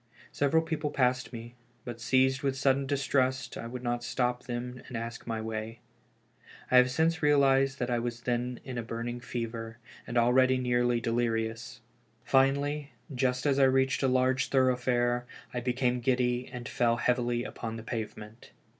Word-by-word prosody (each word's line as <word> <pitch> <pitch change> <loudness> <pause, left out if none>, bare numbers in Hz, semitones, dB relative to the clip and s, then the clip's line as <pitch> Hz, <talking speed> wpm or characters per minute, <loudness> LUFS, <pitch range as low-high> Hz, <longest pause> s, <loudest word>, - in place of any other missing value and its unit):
Several 155 +3 +2
people 160 -2 -2
passed 125 -2 0
me, 120 0 -8 0.3
but 120 -1 -7
seized 130 +2 +2
with 135 -1 -1
sudden 135 0 +2
distrust, 130 -2 0
I 115 - -6
would 125 +1 -7
not 120 0 -1
stop 125 0 -1
them 125 +1 -5
and 125 - -5
ask 115 +1 -6
my 115 -1 -2
way. 110 +1 -5 0.9
I 130 - +6
have 125 0 +6
since 160 +5 +1
realized 135 -2 +4
that 125 -2 -2
I 120 - +1
was 120 0 -4
then 125 0 -2
in 130 -3 -5
a - - -1
burning 115 +1 -5
fever, 115 -2 -5 0.3
and 120 - -2
already 130 +2 +4
nearly 120 -1 +1
delirious. 115 0 -2 0.4
Finally, 140 +2 +1 0.2
just 125 0 0
as 140 -1 +2
I 135 - +6
reached 130 0 +2
a 135 - +3
large 130 0 +2
thoroughfare, 125 -2 +1 0.3
I 125 - -1
became 125 0 0
giddy 125 0 0
and 125 -1 -7
fell 120 -1 +1
heavily 120 -1 0
upon 115 -2 -6
the 110 - -7
pavement. 110 0 -7
125 Hz, 165 wpm, -29 LUFS, 120-130 Hz, 0.9 s, I